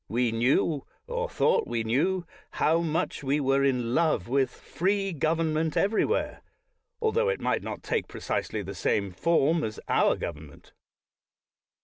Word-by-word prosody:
We 120 Hz, +2 st, +1 dB
knew, 130 Hz, +5 st, +1 dB, 0.2 s
or -, -, -3 dB
thought -, -, +2 dB
we 115 Hz, -1 st, -1 dB
knew, 170 Hz, +11 st, +1 dB, 0.3 s
how 160 Hz, +2 st, +2 dB
much 160 Hz, -2 st, -2 dB
we 140 Hz, +2 st, +1 dB
were 135 Hz, 0 st, +2 dB
in 125 Hz, -3 st, +1 dB
love 155 Hz, -, +2 dB
with 135 Hz, +1 st, +2 dB
free 195 Hz, +1 st, -1 dB
government 160 Hz, 0 st, 0 dB
everywhere, 215 Hz, -, +1 dB, 0.6 s
altho 470 Hz, +1 st, +1 dB
it 485 Hz, -, -1 dB
might -, -, 0 dB
not -, -, -6 dB
take 460 Hz, -2 st, -1 dB
precisely -, -, -3 dB
the -, -, -6 dB
same 100 Hz, -2 st, 0 dB
form 160 Hz, -, +2 dB
as 110 Hz, -, -4 dB
our -, -, +3 dB
government. 75 Hz, -2 st, -8 dB
150 Hz, 140 wpm, -27 LUFS, 120-170 Hz, 0.6 s, our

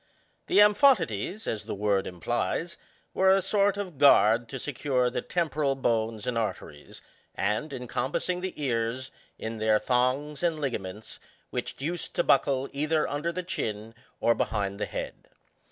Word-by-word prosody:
The -, -, +1 dB
amphotides, 210 Hz, -, +4 dB
as 110 Hz, -, -3 dB
the -, -, -4 dB
word 100 Hz, -1 st, +1 dB
implies, 120 Hz, -, -2 dB, 0.4 s
were 190 Hz, 0 st, +3 dB
a 190 Hz, +1 st, +6 dB
sort 200 Hz, +1 st, +2 dB
of 185 Hz, -7 st, -5 dB
gnard 115 Hz, -4 st, +6 dB
to 135 Hz, -, -5 dB
secure 130 Hz, -2 st, 0 dB
the -, -, -2 dB
temporal 150 Hz, -5 st, 0 dB
bones 115 Hz, -4 st, -1 dB
and 120 Hz, -2 st, 0 dB
arteries, 110 Hz, -, -6 dB, 0.3 s
and 105 Hz, +10 st, -1 dB
encompassing 130 Hz, +7 st, -2 dB
the 185 Hz, -3 st, -5 dB
ears, 125 Hz, -1 st, -1 dB, 0.3 s
in 110 Hz, 0 st, -5 dB
their 110 Hz, 0 st, +3 dB
thongs 130 Hz, +6 st, 0 dB
and 170 Hz, -3 st, 0 dB
ligaments, 105 Hz, -7 st, -5 dB, 0.3 s
which -, -, -4 dB
used 165 Hz, +5 st, -4 dB
to -, -, +2 dB
buckle 135 Hz, -1 st, +2 dB
either 155 Hz, +2 st, +1 dB
under 150 Hz, +4 st, -2 dB
the 180 Hz, +2 st, -4 dB
chin 110 Hz, -, -4 dB, 0.3 s
or 115 Hz, -, +4 dB
behind 100 Hz, -3 st, -2 dB
the -, -, -2 dB
head. -, -, -6 dB
130 Hz, 150 wpm, -27 LUFS, 110-165 Hz, 0.4 s, a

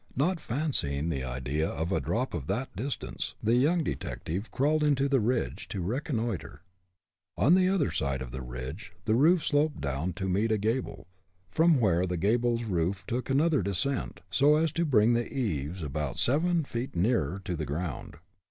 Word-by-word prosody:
Not 165 Hz, +7 st, +1 dB
fancying 110 Hz, -, -1 dB
the 70 Hz, -5 st, -2 dB
idea 65 Hz, +5 st, -2 dB
of 80 Hz, +5 st, -3 dB
a -, -, +2 dB
drop 125 Hz, +4 st, -1 dB
of 75 Hz, -5 st, -4 dB
that 110 Hz, +4 st, -2 dB
distance, 130 Hz, +8 st, -4 dB
the 110 Hz, +2 st, +3 dB
young 155 Hz, +8 st, +3 dB
detective 95 Hz, -, -4 dB
crawled 150 Hz, +1 st, +2 dB
to 140 Hz, +1 st, +2 dB
the 135 Hz, -1 st, +3 dB
ridge, 120 Hz, +2 st, -1 dB
to 100 Hz, -, -4 dB
reconnoiter. 115 Hz, -, -3 dB, 0.7 s
On 155 Hz, -, +5 dB
the 185 Hz, 0 st, +5 dB
other 185 Hz, -, +1 dB
side 70 Hz, -4 st, -1 dB
of 65 Hz, -2 st, -6 dB
the 65 Hz, +1 st, -5 dB
ridge, 65 Hz, -, -7 dB
the 110 Hz, -, +2 dB
roof 155 Hz, +7 st, +4 dB
sloped 150 Hz, +1 st, +1 dB
down 70 Hz, +6 st, -2 dB
to 95 Hz, -2 st, -4 dB
meet 100 Hz, +5 st, +1 dB
a 110 Hz, -, +3 dB
gable, 110 Hz, +5 st, -2 dB, 0.5 s
from 165 Hz, -3 st, +4 dB
where 95 Hz, -5 st, +2 dB
the 90 Hz, 0 st, -2 dB
gable's 115 Hz, +5 st, +1 dB
roof 95 Hz, -2 st, -1 dB
took 125 Hz, +2 st, -3 dB
another 150 Hz, +2 st, +3 dB
descent, 100 Hz, +8 st, -2 dB
so 145 Hz, +2 st, +5 dB
as 160 Hz, 0 st, +2 dB
to 170 Hz, +3 st, 0 dB
bring 120 Hz, -5 st, +4 dB
the 120 Hz, 0 st, -1 dB
eaves 90 Hz, -, -2 dB
about 75 Hz, -2 st, -3 dB
seven 165 Hz, +6 st, +2 dB
feet 120 Hz, -4 st, -5 dB
nearer 95 Hz, -, +1 dB
to 90 Hz, -4 st, -2 dB
the 80 Hz, -1 st, -3 dB
ground. 80 Hz, +2 st, -4 dB
110 Hz, 180 wpm, -29 LUFS, 85-140 Hz, 0.7 s, On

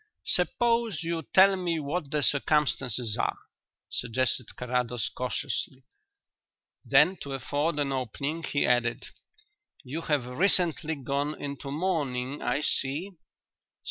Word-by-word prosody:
"Suppose 230 Hz, -5 st, +1 dB
you 165 Hz, 0 st, -2 dB
tell 195 Hz, +1 st, +7 dB
me 175 Hz, -3 st, -1 dB
what 150 Hz, +1 st, -3 dB
the 150 Hz, 0 st, 0 dB
circumstances 135 Hz, -6 st, +1 dB
are," -, -, 0 dB, 0.5 s
suggested 125 Hz, 0 st, -1 dB
Carrados 125 Hz, -1 st, -1 dB
cautiously. 130 Hz, +1 st, -3 dB, 1.0 s
Then, 150 Hz, +7 st, +4 dB
to 140 Hz, -, -7 dB
afford 145 Hz, +4 st, -1 dB
an 145 Hz, -2 st, 0 dB
opening, 140 Hz, +5 st, -3 dB
he 145 Hz, -3 st, 0 dB
added: 120 Hz, 0 st, +1 dB, 0.7 s
"You 145 Hz, +5 st, -5 dB
have 150 Hz, -6 st, 0 dB
recently 160 Hz, +2 st, +3 dB
gone 140 Hz, +2 st, -2 dB
into 140 Hz, 0 st, -5 dB
mourning, 145 Hz, -5 st, -2 dB
I 145 Hz, -, 0 dB
see." 145 Hz, +6 st, 0 dB
145 Hz, 110 wpm, -28 LUFS, 130-165 Hz, 1.0 s, tell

